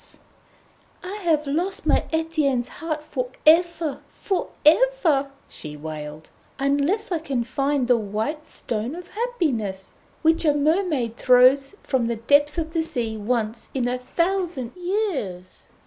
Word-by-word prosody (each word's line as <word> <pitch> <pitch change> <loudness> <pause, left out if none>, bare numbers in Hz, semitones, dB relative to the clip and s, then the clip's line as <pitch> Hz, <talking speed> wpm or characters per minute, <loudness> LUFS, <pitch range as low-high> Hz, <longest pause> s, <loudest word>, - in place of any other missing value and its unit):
"] - - -33
'I 365 +2 -6
have 325 -6 +1
lost 360 +9 -2
my - - +3
Etienne's 310 -6 0
heart 310 -2 -3
for - - -3 0.2
ever, 330 -2 +4
for 385 -2 -3 0.2
ever,' 325 - +4 0.2
she 150 -1 -8
wailed, 150 0 -8 0.3
'unless 285 - +1
I 340 - +1
can 275 -6 -2
find 275 +2 0
the 245 -1 +5
White 220 +9 -3
Stone 230 +5 -4
of 355 0 -9
Happiness, 265 - -2 0.3
which 320 +1 +3
a 300 -3 +3
mermaid 295 - +1
throws 260 +5 +5
from 255 -4 0
the 235 - -1
depths 285 +7 +3
of 320 -1 -3
the 330 - +1
sea 235 -8 -2
once 225 +1 -2
in 250 -2 0
a 250 +1 -1
thousand 335 -2 -2
years. 350 - -3
285 Hz, 140 wpm, -23 LUFS, 235-335 Hz, 0.3 s, the